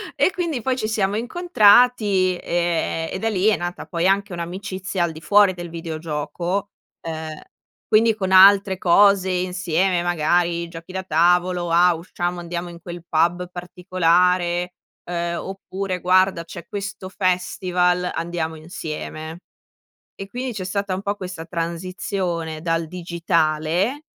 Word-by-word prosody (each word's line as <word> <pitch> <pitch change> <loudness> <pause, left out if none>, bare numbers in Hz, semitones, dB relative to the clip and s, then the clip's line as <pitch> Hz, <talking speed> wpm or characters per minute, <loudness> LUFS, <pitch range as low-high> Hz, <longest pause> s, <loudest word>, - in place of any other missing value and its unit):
e 370 - +3
quindi 340 -9 -2
poi, 260 +3 0
ci 215 -4 -2
siamo 210 -2 0
incontrati, 220 - +4
ehm, 170 -1 -1
e - - -4
da 225 - 0
lì 200 -1 +1
è 220 - +4
nata 175 +1 -5
poi, 170 0 0
anche 200 0 +1
un'amicizia 185 +1 -4
al 170 - 0
di 160 0 -11
fuori 200 +2 +5
del 175 -1 -7
videogioco. 165 +3 -4 0.4
Uhm, 160 -1 -5 0.5
quindi 220 0 +4
con 190 -3 -3
altre 195 0 +7
cose 190 +1 +4
insieme, 180 0 0
magari 170 0 +1
giochi 170 +1 -10
da 190 0 -3
tavolo: 175 +1 +2
"Ah, 175 +1 +5
usciamo 175 +1 -4
andiamo 175 0 -5
in 170 -1 -12
quel 175 -1 -8
pub 175 +3 +1
particolare, 180 0 +1 0.4
uhm, 170 0 -2
oppure 190 -1 -5
guarda 185 -1 +3
c'è 170 0 -10
questo 200 -2 -6
festival 180 -1 0
andiamo 165 -1 -3
insieme." 155 0 -7 0.8
E 195 - -5
quindi 250 +3 -4
c'è 190 -4 -5
stata 200 0 -2
un 185 - -3
po' 200 0 -2
questa 180 -4 -7
transizione 170 -1 -3
dal 165 0 0
digitale, 170 - 0
180 Hz, 135 wpm, -22 LUFS, 170-195 Hz, 0.8 s, altre